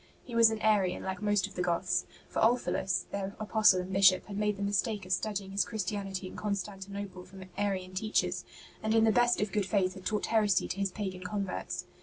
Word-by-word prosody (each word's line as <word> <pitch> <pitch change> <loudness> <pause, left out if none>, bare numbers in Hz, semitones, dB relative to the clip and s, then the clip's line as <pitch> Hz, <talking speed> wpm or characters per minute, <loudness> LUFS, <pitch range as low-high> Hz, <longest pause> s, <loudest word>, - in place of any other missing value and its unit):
He 245 - -10
was 230 -1 +7
an 220 -1 -3
Arian 200 -4 +2
like 190 +1 -4
most 205 -2 +2
of 200 - -9
the 180 - -3
Goths; 180 +1 0 0.2
for - - -3
Ulfilas, 225 -5 +1
their 200 0 -4
apostle 215 -3 +4
and 185 +1 -6
Bishop, 190 -1 +5
had 200 - -7
made 210 0 0
the 200 - -3
mistake 205 0 0
of 185 - -8
studying 195 0 -1
his 200 +1 +2
Christianity 195 -2 -3
in 185 - -8
Constantinople 200 -2 -5
from 190 +1 -11
Arian 190 -2 -2
teachers, 215 +3 0 0.4
and 220 +1 +1
in 225 - +5
the 225 - +5
best 240 +2 +3
of 210 -1 -1
good 205 -2 0
faith 190 -2 +1
had 190 - -11
taught 210 +1 -1
heresy 210 -4 +2
to 195 - -3
his 200 -1 +1
pagan 185 -1 -5
converts. 195 0 -4
200 Hz, 210 wpm, -30 LUFS, 190-210 Hz, 0.4 s, was